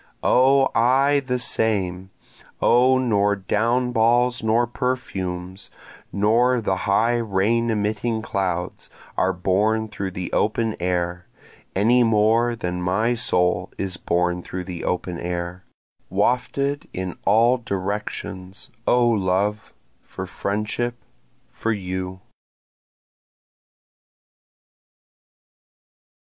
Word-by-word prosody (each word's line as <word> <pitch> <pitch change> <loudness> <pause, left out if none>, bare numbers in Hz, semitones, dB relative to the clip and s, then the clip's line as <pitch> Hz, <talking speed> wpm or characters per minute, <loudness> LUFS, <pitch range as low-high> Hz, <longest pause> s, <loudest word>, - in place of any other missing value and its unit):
O 135 +2 +4
I 135 +5 +3
the 130 -2 -2
same, 95 -6 0 0.5
O 125 +2 +4
nor 105 -5 +2
down 115 +6 0
balls 120 +2 +2
nor 115 +2 +2
perfumes, 95 -8 -4 0.4
nor 120 +5 +3
the 95 -4 0
high 115 +4 +3
rain 115 +2 +1
emitting 110 +1 -1
clouds, 90 -4 -3 0.3
are 95 - +2
borne 100 +5 +1
through 100 -2 -4
the 90 -1 -6
open 110 +1 +1
air, 90 0 -2 0.5
Any 115 +6 +4
more 115 +1 +3
than 90 -4 -4
my 105 +7 +1
soul 90 -5 0
is 95 -2 -3
borne 90 0 0
through 90 +1 -6
the 90 -2 -7
open 90 -1 -2
air, 90 +1 -4 0.4
Wafted 125 +8 0
in 95 -1 -4
all 115 +5 +4
directions 100 +1 -5 0.2
O 120 -1 +4
love, 105 0 0 0.3
for 95 - -7
friendship, 105 +5 -2 0.6
for 115 - -2
you. 95 -2 -4
105 Hz, 100 wpm, -23 LUFS, 95-120 Hz, 0.6 s, O